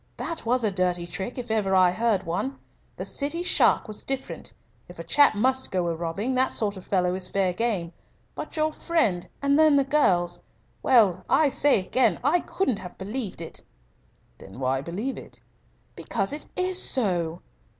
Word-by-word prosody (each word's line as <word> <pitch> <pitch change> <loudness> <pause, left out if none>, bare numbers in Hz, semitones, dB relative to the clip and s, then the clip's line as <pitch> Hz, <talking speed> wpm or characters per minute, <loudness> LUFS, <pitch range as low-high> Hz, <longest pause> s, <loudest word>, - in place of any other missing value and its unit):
That 330 -8 -5
was 245 +1 +2
a 215 - +2
dirty 180 -2 0
trick, 190 +8 -6
if 245 -2 -5
ever 200 -3 +1
I 185 -1 +5
heard 215 0 0
one. 260 +11 -3 0.4
The - - -5
City 300 +5 0
shark 360 - +3
was 215 -1 -4
different. 270 -1 -4 0.4
If - - -12
a - - -6
chap 285 -6 +5
must 260 +5 +1
go 180 -3 -1
a - - -1
robbing, 175 +9 -3
that 260 +1 +1
sort 210 -2 0
of 190 - -11
fellow 180 -2 +1
is 185 0 -2
fair 190 -2 0
game. 190 -6 -2 0.4
But - - -7
your 310 0 +1
friend, 225 - 0 0.2
and 280 +1 +3
then 310 -2 +6
the 280 - +4
girls 180 -12 +1 0.4
well, 200 -8 +4
I 305 -2 +4
say 285 -3 +4
again, 250 +7 +1
I 305 +7 +3
couldn't 270 - -2
have 180 -1 -10
believed 205 -2 -4
it." 165 - -7 0.8
"Then 95 +5 -12
why 130 0 0
believe 200 - -4
it?" - - -10 0.5
"Because 195 +2 -2
it 300 - -6
is 365 0 +1
so." 175 -9 0
215 Hz, 180 wpm, -25 LUFS, 180-270 Hz, 0.8 s, then